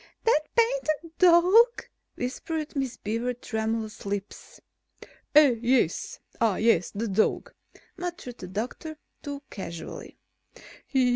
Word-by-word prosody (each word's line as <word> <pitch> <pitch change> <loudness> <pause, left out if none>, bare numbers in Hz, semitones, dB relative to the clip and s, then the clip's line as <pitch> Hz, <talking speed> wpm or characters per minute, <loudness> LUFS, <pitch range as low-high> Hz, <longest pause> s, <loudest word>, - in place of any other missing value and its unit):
"That 450 -9 +4 0.2
painted 345 -10 +1
dog?" 365 +7 +6 0.3
whispered 300 +5 -4
Miss 265 -4 -2
Beaver's 230 +4 -2
tremulous 220 -1 -3
lips. 200 0 -6 0.8
"Eh? 285 -6 +7
Yes. 240 -8 +1 0.2
Ah, 220 -4 +3
yes, 215 -6 +3
the 225 +3 -3
dog," 210 +2 0 0.4
murmured 345 -9 -6
the 185 - -7
doctor, 240 - -5 0.2
too 285 0 -6
casually. 170 -5 -8
250 Hz, 100 wpm, -27 LUFS, 220-320 Hz, 0.8 s, Eh